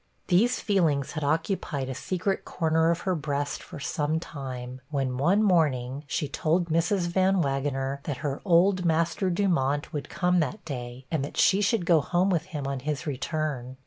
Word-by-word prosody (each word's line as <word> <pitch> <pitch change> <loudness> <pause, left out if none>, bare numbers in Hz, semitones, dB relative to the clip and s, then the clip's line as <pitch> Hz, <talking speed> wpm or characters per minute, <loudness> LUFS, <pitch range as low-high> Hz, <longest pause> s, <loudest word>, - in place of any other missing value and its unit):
These 230 +8 +3
feelings 160 - +1
had 155 - -4
occupied 150 -2 -1
a 130 - -3
secret 185 +7 -2
corner 160 -1 +1
of 170 0 0
her 190 - 0
breast 145 -3 -2
for - - -10
some 150 +2 -1
time, 130 -5 -7
when, 135 -4 -1
one 185 +9 +3
morning, 145 -7 +1
she 145 - -1
told 165 +5 0
Mrs. 170 +5 +2
Van 190 +2 +2
Wagener 135 0 -1
that 145 -4 -3
her 140 -1 -2
old 185 0 +4
master 170 +3 +1
Dumont 165 -7 0
would 145 -2 -4
come 180 0 +2
that 165 +7 -2
day, 125 -3 -6
and 155 -4 0
that 145 - -6
she 195 +1 +4
should 205 -2 +1
go 170 -3 +5
home 180 +5 +1
with 165 -3 0
him 150 -7 -5
on 135 -1 -2
his 150 +3 -3
return. 135 -2 -3
155 Hz, 175 wpm, -27 LUFS, 140-180 Hz, -, go